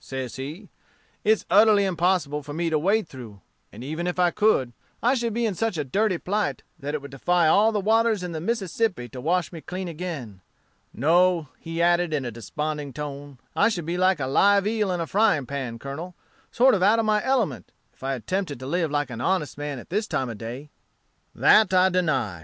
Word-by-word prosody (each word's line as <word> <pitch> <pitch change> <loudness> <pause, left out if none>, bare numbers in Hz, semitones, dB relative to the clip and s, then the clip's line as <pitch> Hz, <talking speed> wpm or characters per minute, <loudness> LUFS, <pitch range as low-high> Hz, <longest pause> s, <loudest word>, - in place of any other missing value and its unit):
says 130 -2 -6
he: 155 +10 -7 0.6
'it's 215 0 +2
utterly 205 +1 +6
impossible 175 -5 0
for 145 +1 -8
me 165 0 -1
to 155 - +2
wade 200 +4 +1
through; 115 -8 -11 0.3
and 120 - -10
even 155 +6 -3
if 180 - -2
I 180 -1 +3
could, 150 - +2 0.3
I 245 +3 +4
should 235 -3 -1
be 235 +2 -1
in 215 - 0
such 220 0 -2
a 150 - 0
dirty 195 +7 0
plight, 205 +4 -2 0.2
that 145 +1 -4
it 145 - -5
would 140 - -9
defy 170 +5 +2
all 210 +7 +5
the 210 - 0
waters 220 0 +2
in 180 - -4
the 160 -1 -5
Mississippi 195 - -1
to 125 +2 -8
wash 175 +4 0
me 165 -3 -8
clean 185 +3 -5
again. 155 - -6 0.5
No,' 170 +2 +2
he 165 0 -3
added 175 -2 +2
in 140 -3 -2
a 120 - -3
desponding 150 +4 -4
tone, 145 -2 -7 0.2
'I 205 - +4
should 175 -8 -3
be 170 +2 -2
like 185 -2 +3
a 130 - -1
live 200 +9 +4
eel 210 -2 0
in 180 - -1
a 165 - -1
frying 195 -6 +2
pan, 130 -3 -5
Colonel, 150 +8 -7 0.4
sort 260 +2 +4
of 195 - +1
out 205 +4 +5
of 225 - +1
my 210 -1 +2
element, 230 - -1 0.2
if - - -32
I 135 +1 -2
attempted 160 - -3
to - - -6
live 165 +3 0
like 145 -2 -1
an 115 0 -6
honest 170 0 0
man 145 -1 -5
at 125 - -12
this 210 +3 0
time 130 -3 -2
o' - - -5
day.' 120 +7 -8 0.6
"'That 215 -3 +5
I 185 +1 +5
deny. 155 - 0
170 Hz, 215 wpm, -25 LUFS, 140-200 Hz, 0.6 s, utterly